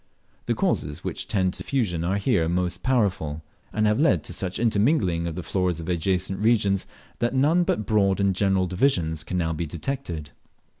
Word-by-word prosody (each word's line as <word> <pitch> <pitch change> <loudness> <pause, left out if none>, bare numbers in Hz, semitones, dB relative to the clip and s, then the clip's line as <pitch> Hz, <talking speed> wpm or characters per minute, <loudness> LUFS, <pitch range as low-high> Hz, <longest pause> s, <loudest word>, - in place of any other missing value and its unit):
The - - +1
causes 75 - -1
which - - -4
tend 95 -2 +1
to - - -8
diffusion 100 -12 -1
are 95 +4 0
here 100 -6 +1
most 90 0 -1
powerful, 90 - 0 0.3
and 110 0 +1
have 105 +3 +2
led 100 - +3
to - - -5
such 95 -1 -2
intermingling 105 - +2
of 80 - -4
the 90 - -5
floras 90 -3 -1
of 80 - -7
adjacent 90 +2 0
regions 105 -3 +2 0.3
that 120 +2 0
none 150 +7 +4
but 110 -10 -1
broad 100 -2 +2
and 100 -1 +2
general 95 -1 +2
divisions 90 - 0
can 90 - -3
now 80 -2 0
be 80 +1 -3
detected. 85 - -5
95 Hz, 185 wpm, -25 LUFS, 85-110 Hz, 0.3 s, none